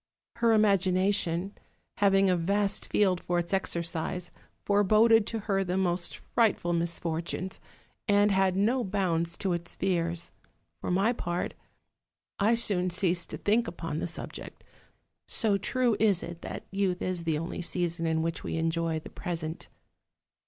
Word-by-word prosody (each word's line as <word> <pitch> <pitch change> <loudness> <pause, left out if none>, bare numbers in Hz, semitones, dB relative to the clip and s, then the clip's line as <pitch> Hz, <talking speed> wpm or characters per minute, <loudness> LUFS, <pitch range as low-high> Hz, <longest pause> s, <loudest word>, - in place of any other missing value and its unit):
Her 235 -1 +3
imagination, 195 -2 +2 0.4
having 195 -1 +4
a 185 - +3
vast 200 +4 0
field 185 -4 +2
for 175 - -1
its 170 +1 -2
exercise, 170 -1 -1 0.3
foreboded 215 +2 +4
to 225 -1 -3
her 195 -2 0
the 180 0 -2
most 175 -2 0 0.2
frightful 210 -7 +2
misfortunes, 170 +2 -2 0.5
and 205 0 +4
had 190 -1 +2
no 235 +6 +2
bounds 170 -4 -1
to 190 -2 -1
its 170 0 -5
fears: 170 -2 -1 0.5
for - - -4
my 195 +6 +2
part, 175 -6 -3 0.9
I 215 +3 +4
soon 190 -6 +2
ceased 175 -1 +1
to - - -5
think 225 +3 +1
upon 165 -3 -4
the - - -2
subject, 170 - -7 0.6
so 215 -4 +2
true 240 +3 +1
is 205 -4 +3
it 170 0 -8
that - - -7
youth 195 -2 0
is 180 -2 -2
the 160 -2 0
only 165 +3 -4
season 170 -1 -1
in 160 0 +1
which 165 0 -3
we - - -3
enjoy 165 0 0
the 155 - -9
present. 165 -3 -5
185 Hz, 145 wpm, -29 LUFS, 170-200 Hz, 0.9 s, having